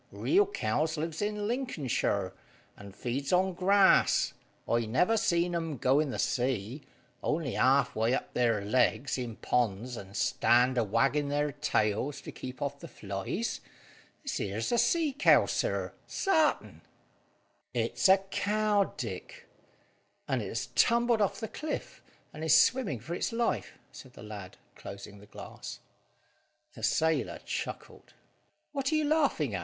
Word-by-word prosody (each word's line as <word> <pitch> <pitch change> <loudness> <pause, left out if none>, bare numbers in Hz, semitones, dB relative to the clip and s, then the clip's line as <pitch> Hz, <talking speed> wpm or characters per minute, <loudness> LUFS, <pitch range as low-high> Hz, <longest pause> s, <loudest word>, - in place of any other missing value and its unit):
Real 395 +3 +2
cows 155 - -1
lives 160 +2 -3
in 205 0 -2
Lincolnshire, 145 - -1 0.4
and 100 -1 -12
feeds 135 +3 -3
on 185 +1 +3
grass. 190 +2 +4 0.3
I 115 -1 +1
never 180 - +2
see 170 -5 +2
'em 165 -4 -3
go 130 +4 +3
in 150 -2 0
the - - -4
sea, 125 +1 -1 0.4
only 155 -5 -1
halfway 130 -3 +2
up - - -5
their 115 -5 +1
legs 125 +3 +1
in 120 -3 -5
ponds, 120 +1 -1
and 100 -2 -8
stand 125 +1 +3
a - - +3
waggin' 140 +7 +1
their 145 +1 0
tails 140 -2 0
to - - -8
keep 130 +1 -7
off 140 0 -4
the - - -9
flies. 100 - -4 0.6
This 275 - -3
here's 105 +3 -2
a 240 - +3
sea 320 -1 +2
cow, 280 - +5
sir, - - -1
sartin." 320 -6 +1 0.9
"It's - - +1
a 190 - +8
cow, 205 +1 0
Dick; - - -7 0.8
and - - 0
it - - -4
has - - -3
tumbled 235 -1 +3
off 200 -1 0
the 220 - -4
cliff, 305 +8 -5 0.3
and 155 - -7
is 160 -1 +6
swimming 250 - +2
for 135 +10 -6
its 175 - -2
life," 230 0 -1
said 130 -2 -13
the - - -12
lad, 105 -3 -9 0.2
closing 100 +1 -10
the 105 - -16
glass. - - -9 0.9
The - - -12
sailor 160 0 +1
chuckled. - - -6 0.6
"What 275 0 -1
are - - +2
you 310 -1 +2
laughing 285 - +1
at?" 95 - -1
150 Hz, 150 wpm, -30 LUFS, -, 0.9 s, a